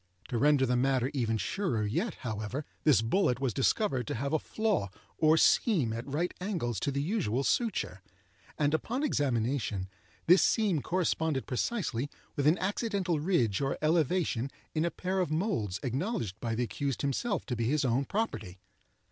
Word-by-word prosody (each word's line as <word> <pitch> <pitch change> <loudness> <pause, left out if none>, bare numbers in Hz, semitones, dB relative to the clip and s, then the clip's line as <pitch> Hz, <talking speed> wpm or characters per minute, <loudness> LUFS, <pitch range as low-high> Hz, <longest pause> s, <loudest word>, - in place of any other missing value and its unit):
To 120 - -1
render 145 -1 +4
the 125 0 +1
matter 130 +1 +1
even 115 -5 0
surer 115 - -1
yet, 170 - -1
however, 110 +4 -4 0.2
this 145 -7 +5
bullet 125 - +2
was 135 -4 0
discovered 135 - +1
to - - -2
have 140 +5 -2
a 155 - +3
flaw 215 - -1 0.3
or 155 0 +5
seam 160 - +3
at 115 +3 -5
right 170 +5 -1
angles 165 - -2
to 140 - -1
the 140 +1 -1
usual 140 - 0
suture, 230 - 0 0.6
and 150 0 +2
upon 245 - -1
examination, 120 - 0 0.4
this 180 +3 +7
seam 200 -9 +2
corresponded 160 -5 0
precisely 145 - -1 0.3
with 140 0 +1
an 160 +4 +5
accidental 195 -4 -1
ridge 140 - +1
or 135 0 0
elevation 155 -4 +1 0.2
in 155 +1 +1
a - - +1
pair 185 +2 -2
of 180 - +1
moulds 155 - -1
acknowledged 130 - -2
by 115 -1 -2
the 120 - 0
accused 135 +1 -3
himself 185 - -1
to 125 - -2
be 115 0 -1
his 150 0 +1
own 130 +3 +1
property. 120 - -3
140 Hz, 165 wpm, -30 LUFS, 120-180 Hz, 0.6 s, this